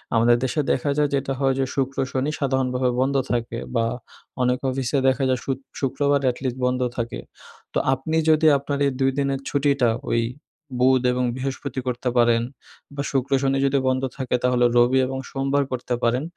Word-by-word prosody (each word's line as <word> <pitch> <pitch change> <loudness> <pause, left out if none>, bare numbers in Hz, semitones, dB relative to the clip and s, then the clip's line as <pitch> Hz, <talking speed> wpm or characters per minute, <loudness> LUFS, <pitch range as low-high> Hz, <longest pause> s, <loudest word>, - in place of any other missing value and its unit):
আমাদের 120 +1 +4
দেশে 150 +4 0
দেখা 140 +3 0
যায় 150 -1 +2
যেটা 135 0 -1
হয় 135 -1 +2
যে 135 - +2
শুক্র-শনি 135 +1 -1
সাধারণভাবে 130 -2 0
বন্ধ 135 +2 +1 0.2
থাকে 120 -1 -2 0.2
বা 115 -1 +2 0.6
অনেক 125 0 +1
অফিসে 130 +1 -1
দেখা 135 +1 +2
যায় 130 -1 +1
শুত 135 -2 -1 0.2
শুক্রবার 140 +1 +1
এটলিস্ট 130 0 -4
বন্ধ 125 0 0 0.2
থাকে। 120 -1 -3 0.5
তো - - 0 0.2
আপনি 160 +5 -2
যদি 155 0 +5
আপনার 140 0 -3
এই - - 0
২ 135 0 +3
দিনের 140 -1 0
ছুটিটা 140 -4 +2 0.2
ওই 115 - +2 0.6
বুধ 130 0 +4
এবং 125 0 0
বৃহস্পতি 135 0 -4
করতে 125 0 -1
পারেন 120 -1 +4 0.5
বা 140 - -2
শুক্র 135 0 -1
শনি 135 0 +1
যদি 140 0 +2
বন্ধ 130 0 +1
থাকে 130 -2 -1
তাহলে 125 -1 +3
রবি 125 +2 +4
এবং 130 0 -4
সোমবার 135 +1 0
করতে 125 0 -3
পারেন, 125 +4 +1
130 Hz, 170 wpm, -23 LUFS, 125-140 Hz, 0.6 s, যদি